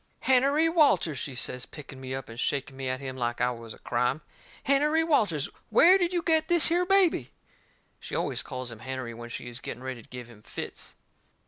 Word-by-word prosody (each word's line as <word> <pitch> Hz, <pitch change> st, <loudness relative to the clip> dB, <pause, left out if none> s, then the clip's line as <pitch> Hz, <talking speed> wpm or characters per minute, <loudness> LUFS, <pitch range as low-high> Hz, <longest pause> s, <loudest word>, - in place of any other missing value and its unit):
"Hennerey 275 Hz, +5 st, +4 dB
Walters," 280 Hz, -, +3 dB
she 135 Hz, -, -5 dB
says 125 Hz, 0 st, -2 dB
picking 135 Hz, -3 st, -11 dB
me 130 Hz, 0 st, -4 dB
up, 135 Hz, -2 st, -6 dB
and 115 Hz, +1 st, -9 dB
shaking 135 Hz, 0 st, -1 dB
me 135 Hz, -1 st, -3 dB
at 130 Hz, 0 st, -2 dB
him 130 Hz, -2 st, -6 dB
like 120 Hz, -2 st, -2 dB
I 125 Hz, -, +2 dB
was 115 Hz, -2 st, -8 dB
a -, -, -9 dB
crime, 125 Hz, +5 st, 0 dB, 0.4 s
"Hennerey 300 Hz, +4 st, +3 dB
Walters, 205 Hz, -, +2 dB, 0.2 s
where 370 Hz, +3 st, +7 dB
did 350 Hz, -1 st, +1 dB
you 350 Hz, -2 st, -1 dB
get 320 Hz, -2 st, +2 dB
this 345 Hz, -2 st, +4 dB
here 350 Hz, +2 st, +2 dB
baby?" 365 Hz, -, +3 dB, 0.7 s
She -, -, -6 dB
always -, -, 0 dB
calls 130 Hz, -1 st, -6 dB
him 115 Hz, -, -10 dB
Hennerey 130 Hz, -1 st, -5 dB
when 120 Hz, +1 st, -9 dB
she 120 Hz, -, -6 dB
is 120 Hz, 0 st, -7 dB
getting 125 Hz, -, -7 dB
ready 130 Hz, -2 st, -5 dB
to -, -, -21 dB
give 125 Hz, -1 st, -8 dB
him 115 Hz, -3 st, -15 dB
fits. -, -, -7 dB
135 Hz, 210 wpm, -28 LUFS, -, 0.7 s, where